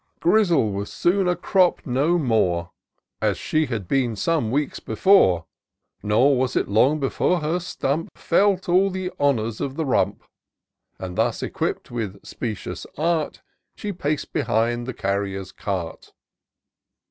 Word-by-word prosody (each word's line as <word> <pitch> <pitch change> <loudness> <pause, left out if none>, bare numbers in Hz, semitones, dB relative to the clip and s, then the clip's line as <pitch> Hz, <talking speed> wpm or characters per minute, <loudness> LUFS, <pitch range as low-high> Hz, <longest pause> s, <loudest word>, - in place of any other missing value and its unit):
Grizzle 175 - +3
was 100 +1 -4
soon 185 +2 +1
a 180 - +2
crop 180 +1 +2
no 145 +6 +2
more. 95 - +1 0.5
As - - +1
she 155 -1 0
had 110 -7 -4
been 125 -2 +1
some 150 +1 0
weeks 140 +4 -1
before; 105 - +3 0.6
Nor 120 +7 +3
was 130 -1 0
it - - +1
long 130 +9 +3
before 155 +5 +1
her 160 +4 0
stump 165 -3 -2
Felt 190 +1 +2
all 185 +3 +4
the 185 -1 -4
honours 115 -6 +1
of 135 -1 -3
the 160 0 -2
rump: 100 -7 0 0.7
And 90 -1 -6
thus - - +1
equipp'd - - -3
with 105 -5 -5
specious 110 -5 -5
art, 160 0 -1 0.3
She 205 -1 -4
pac'd 150 -4 -3
behind 120 -1 0
the 130 - -3
carrier's 95 -1 -2
cart. 95 -5 -5
135 Hz, 140 wpm, -23 LUFS, 105-170 Hz, 0.7 s, all